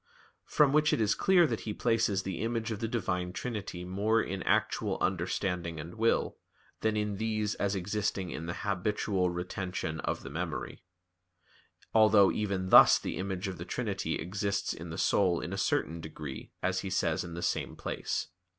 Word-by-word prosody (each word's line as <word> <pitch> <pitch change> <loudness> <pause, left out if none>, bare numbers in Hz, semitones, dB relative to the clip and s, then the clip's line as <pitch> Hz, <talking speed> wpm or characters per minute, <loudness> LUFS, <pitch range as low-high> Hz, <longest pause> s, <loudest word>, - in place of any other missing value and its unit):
From 145 -2 +4
which 150 0 +4
it - - +1
is 105 -1 +3
clear 185 -3 +4
that 115 -8 -1
he 105 -2 -5
places 115 -5 +1
the 95 -3 -4
image 115 0 -1
of 105 - -3
the 115 - -1
Divine 90 -6 -2
Trinity 100 -6 -5
more 105 +5 +1
in 95 -3 -2
actual - - +1
understanding 90 -2 -1
and 80 +3 -7
will, 115 +1 +1 0.4
than 110 -1 0
in 105 -1 -1
these 110 -1 -1
as 100 0 -1
existing 95 -1 -2
in 80 - -5
the 85 - -3
habitual 100 -1 0
retention 90 -2 -4
of - - -3
the 70 - -8
memory; 80 +1 -4 1.1
although 110 -3 +6
even 100 -3 -2
thus - - +9
the - - -4
image 95 +1 -3
of 95 -3 -5
the - - -4
Trinity 95 -6 -2
exists 100 +3 -2
in 85 +1 -8
the 80 - -6
soul 90 -4 +2
in - - -5
a - - -1
certain 80 +1 0
degree, 75 -4 -7
as 95 0 +1
he 95 - -4
says 95 - 0
in 85 -1 -7
the 85 - -5
same - - -1
place. - - -3
95 Hz, 180 wpm, -30 LUFS, 90-110 Hz, 1.1 s, thus